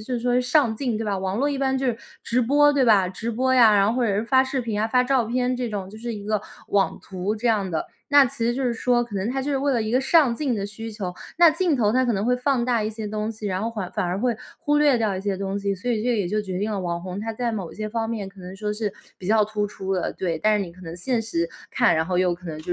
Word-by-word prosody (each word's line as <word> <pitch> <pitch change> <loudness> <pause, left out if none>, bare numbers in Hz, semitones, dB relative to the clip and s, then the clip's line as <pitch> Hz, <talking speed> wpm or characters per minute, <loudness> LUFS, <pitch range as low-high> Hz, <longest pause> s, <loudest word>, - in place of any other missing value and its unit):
是 245 +3 -3
说 245 +1 +2
上 250 -2 +2
镜， 240 -2 -2
对 225 - -3
吧， 200 -2 -1
网 190 +1 -2
络 280 +5 +1
一 280 - -2
般 265 -1 +1
就 265 - -2
是 235 -3 0 0.2
直 245 +2 +1
播 290 +4 +4
对 280 -2 +2
吧， 200 -5 +5
直 220 +6 -4
播 260 +3 +1
呀， 230 -4 +6
然 200 -1 +4
后 220 - +1
或 240 - +2
者 200 - +1
是 215 - 0
发 260 +2 +4
视 265 -1 -2
频 220 -3 -2
啊， 220 - 0
发 250 +1 +3
照 255 -3 +2
片 250 +2 0
这 250 -1 -2
种， 200 -3 -5
就 215 - -11
是 235 0 -4
一 205 -1 -8
个 215 -1 0 0.3
网 200 -1 +1
图 190 +3 -3
这 240 +3 -3
样 205 -5 +1
的。 160 - -1 0.3
那 285 -1 +8
其 265 +1 -5
实 240 - +1
就 270 - -2
是 245 -2 +1
说 240 +1 +1
可 235 -3 -11
能 195 +3 -1
他 265 +1 -2
就 290 - -2
是 275 - +1
为 280 +1 +1
了 240 -4 +1
一 215 - -3
个 250 +3 +3
上 270 -2 +4
镜 270 -2 -1
的 200 - -2
需 225 +3 -6
求， 200 -4 -5 0.2
那 340 0 +7
镜 335 -1 +1
头 215 -4 +2
它 255 0 +2
可 235 - +1
能 195 +2 -1
会 250 +1 +3
放 250 -1 0
大 240 -3 +1
一 215 - -1
些 220 -1 -6
东 215 +1 -3
西， 215 -1 -6
然 190 0 -2
后 230 - -1
缓 200 -5 -5
反 210 - -1
而 180 +1 -1
会 240 +1 +1 0.2
忽 295 -3 +1
略 290 -3 +4
掉 220 -4 0
一 185 - -3
些 200 -1 -2
东 195 +1 -3
西， 200 0 -1
所 225 +7 -4
以 220 -2 0
这 240 -1 +1
也 200 - 0
就 210 +4 0
决 190 -3 -4
定 210 +3 -1
了 200 - -2
网 170 -1 -3
红 185 +1 -5
他 225 +1 -4
在 235 0 -1
某 190 -6 -4
些 215 +1 -5
方 225 +1 -2
面 220 -4 -3
可 195 0 -13
能 180 +1 -9
说 210 +1 -2
是 210 -1 -2 0.3
比 180 - -8
较 215 +1 +4
突 210 -1 -2
出 195 -1 -5
的， 185 -2 -1
对。 170 -4 -2
但 215 +3 +3
是 200 - -1
你 170 - -10
可 185 - -17
能 165 -1 -8
现 240 +6 0
实 170 -7 -1 0.2
看， - - +3
然 160 0 0
后 180 0 -1
又 180 -1 +2
可 180 +1 -14
能 155 -2 -5
就 175 +3 -3
220 Hz, 340 characters per minute, -24 LUFS, 195-250 Hz, 0.3 s, 那